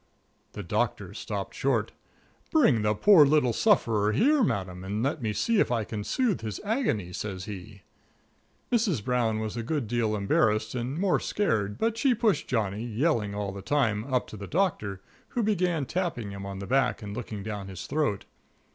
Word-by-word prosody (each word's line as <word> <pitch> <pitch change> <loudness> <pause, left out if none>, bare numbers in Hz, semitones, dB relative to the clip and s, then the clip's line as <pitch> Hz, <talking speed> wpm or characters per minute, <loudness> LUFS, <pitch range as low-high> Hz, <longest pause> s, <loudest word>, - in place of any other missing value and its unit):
The - - -6
Doctor - - -1
stopped - - -5
short. - - 0 0.6
"Bring 150 - +4
the 105 0 +1
poor 190 - +7
little 145 -4 +3
sufferer 110 - +3
here, 285 - +4
Madam, 95 - -2
and 105 +4 -2
let 140 +2 -1
me 110 -2 -1
see 225 - +1
if - - +2
I 115 -2 +1
can 105 0 -5
soothe 225 - 0
his 110 -2 -4
agony," 200 - -1
says 95 -2 -5
he. 100 -1 -9 0.9
Mrs. 210 - +1
Brown 120 -3 +1
was 110 0 -3
a 120 - -2
good 130 +1 -2
deal 110 -1 0
embarrassed 105 +1 +1
and 125 +3 -3
more 190 0 +2
scared, 105 - -1
but 225 0 0
she 255 0 +3
pushed 215 -3 +1
Johnny, 105 -3 -1
yelling 115 -3 0
all 100 -1 -2
the 100 0 -7
time, 115 0 0
up 125 -1 +1
to 110 - -8
the 100 -1 -7
Doctor, 105 - -1 0.2
who 240 - -2
began 180 -8 +1
tapping 160 - -2
him 100 0 -7
on 100 -1 -6
the 100 - -6
back 130 -1 +1
and 100 0 -6
looking 110 -4 -5
down 105 -2 -5
his 95 -2 -7
throat. 145 -10 -1
115 Hz, 180 wpm, -27 LUFS, 105-160 Hz, 0.9 s, poor